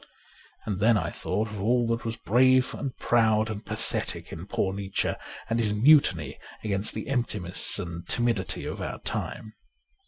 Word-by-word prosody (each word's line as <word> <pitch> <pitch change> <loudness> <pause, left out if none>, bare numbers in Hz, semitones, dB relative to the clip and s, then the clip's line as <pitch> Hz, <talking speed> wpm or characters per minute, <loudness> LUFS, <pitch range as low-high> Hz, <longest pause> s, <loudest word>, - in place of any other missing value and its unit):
And 100 -4 -2
then 110 +2 +5
I 85 -4 -2
thought 105 +4 -2
of 105 -2 -6
all 120 +3 +2
that 115 +1 0
was 115 0 -3
brave 130 +4 +4
and 135 -3 -5
proud 110 -2 +2
and 105 -1 -6
pathetic - - -2
in 85 +4 -7
poor 95 -2 0
Nietzsche 100 -1 -1 0.3
and 115 +1 0
his 105 -2 +1
mutiny 105 - +4 0.2
against 100 -1 -1
the 110 - -4
emptiness 110 -9 -1
and 85 0 -6
timidity 120 -5 0
of - - -5
our - - -4
time. 110 - -4
110 Hz, 160 wpm, -27 LUFS, 95-120 Hz, 0.3 s, then